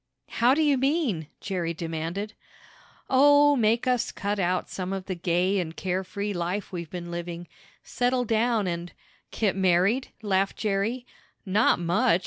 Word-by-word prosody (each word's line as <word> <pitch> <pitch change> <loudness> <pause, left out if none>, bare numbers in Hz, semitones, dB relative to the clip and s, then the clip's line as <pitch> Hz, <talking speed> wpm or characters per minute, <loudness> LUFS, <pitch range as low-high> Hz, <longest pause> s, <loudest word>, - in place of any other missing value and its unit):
"How 245 +3 +3
do 315 - +2
you 285 -3 +3
mean?" 270 - 0
Jerry 175 -4 -2
demanded. 165 +6 -4 0.7
"Oh, 290 +2 +6
make 230 0 +2
us 250 -2 +1
cut 205 0 -3
out 180 0 0
some 185 0 -4
of 190 -1 -4
the 190 - -3
gay 180 +2 +1
and 165 -2 -4
carefree 190 +2 -3
life 180 +3 -3
we've 170 -3 -5
been 175 -1 -6
living. 175 0 -5 0.4
Settle 250 0 0
down 225 -1 +1
and 175 -1 -4 0.2
" - - -36
"Get 205 -4 0
married?" 190 +7 +2 0.2
laughed 195 -1 0
Jerry. 220 +4 -1 0.4
"Not 205 +3 +3
much!" 170 0 +2
195 Hz, 150 wpm, -26 LUFS, 175-235 Hz, 0.7 s, Oh